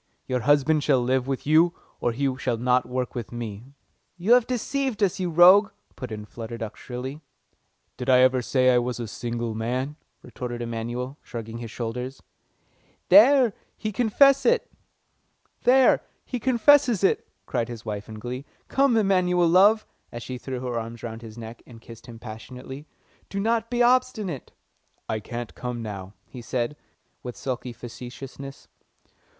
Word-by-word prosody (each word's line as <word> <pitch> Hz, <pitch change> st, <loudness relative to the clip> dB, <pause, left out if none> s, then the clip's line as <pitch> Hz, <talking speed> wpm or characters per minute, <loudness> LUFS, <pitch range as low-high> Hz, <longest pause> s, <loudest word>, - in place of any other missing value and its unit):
Your 130 Hz, -1 st, -1 dB
husband 145 Hz, +4 st, +3 dB
shall 140 Hz, -3 st, +3 dB
live 130 Hz, +1 st, +1 dB
with 135 Hz, -1 st, -3 dB
you, 160 Hz, +3 st, +4 dB, 0.2 s
or 120 Hz, -, 0 dB
he 135 Hz, +2 st, -1 dB
shall 125 Hz, -3 st, -1 dB
not 125 Hz, +1 st, +2 dB
work 125 Hz, 0 st, -2 dB
with 120 Hz, -3 st, -6 dB
me." 120 Hz, +2 st, -7 dB, 0.4 s
"You 190 Hz, +7 st, +3 dB
have 245 Hz, -2 st, +5 dB
deceived 255 Hz, -2 st, -1 dB
us, 195 Hz, -1 st, +1 dB
you 180 Hz, -1 st, -1 dB
rogue!" 185 Hz, +5 st, +7 dB, 0.3 s
put 125 Hz, -4 st, -7 dB
in 105 Hz, -1 st, -6 dB
Flutter 115 Hz, +1 st, -7 dB
Duck 110 Hz, -2 st, -6 dB
shrilly. 130 Hz, +4 st, -7 dB, 0.8 s
"Did 125 Hz, +1 st, -4 dB
I 125 Hz, -1 st, +6 dB
ever 130 Hz, 0 st, +4 dB
say 130 Hz, +1 st, +3 dB
I 125 Hz, -, +5 dB
was 120 Hz, 0 st, -3 dB
a 120 Hz, -, -4 dB
single 120 Hz, +1 st, -4 dB
man?" 125 Hz, +6 st, -3 dB, 0.3 s
retorted 120 Hz, 0 st, -6 dB
Emanuel, 120 Hz, +4 st, -4 dB
shrugging 115 Hz, 0 st, -7 dB
his 115 Hz, -1 st, -6 dB
shoulders. 125 Hz, +3 st, -5 dB, 0.9 s
"There! 235 Hz, +4 st, +7 dB, 0.2 s
He 215 Hz, -, -3 dB
confesses 275 Hz, -, +4 dB, 1.1 s
it!" 255 Hz, -2 st, +3 dB, 0.2 s
cried 115 Hz, -, -1 dB
his 115 Hz, -2 st, -8 dB
wife 105 Hz, 0 st, -5 dB
in 110 Hz, -, -8 dB
glee. 125 Hz, +4 st, -5 dB, 0.3 s
"Come, 270 Hz, -4 st, +3 dB
Emanuel, 180 Hz, -4 st, +3 dB
love," 200 Hz, +6 st, +5 dB, 0.3 s
and 120 Hz, 0 st, -7 dB
she 125 Hz, -1 st, -6 dB
threw 130 Hz, -1 st, -5 dB
her 125 Hz, -2 st, -2 dB
arms 115 Hz, 0 st, -8 dB
round 115 Hz, -1 st, -6 dB
his 115 Hz, -1 st, -11 dB
neck, 115 Hz, 0 st, -9 dB
and 115 Hz, -2 st, -13 dB
kissed 115 Hz, +1 st, -13 dB
him 115 Hz, -1 st, -10 dB
passionately. 125 Hz, +5 st, -9 dB, 0.4 s
"Do 200 Hz, -, -3 dB
not 225 Hz, +2 st, 0 dB
be 245 Hz, 0 st, +2 dB
obstinate." 240 Hz, -, +1 dB, 0.6 s
"I 110 Hz, -, -1 dB
can't 120 Hz, +2 st, -6 dB
come 125 Hz, -2 st, -5 dB
now," 100 Hz, -2 st, -7 dB
he 125 Hz, -, -10 dB
said, 120 Hz, +3 st, -2 dB, 0.5 s
with 125 Hz, -1 st, -7 dB
sulky 130 Hz, -1 st, -4 dB
facetiousness. 125 Hz, +3 st, -9 dB
130 Hz, 155 wpm, -25 LUFS, 120-185 Hz, 1.1 s, rogue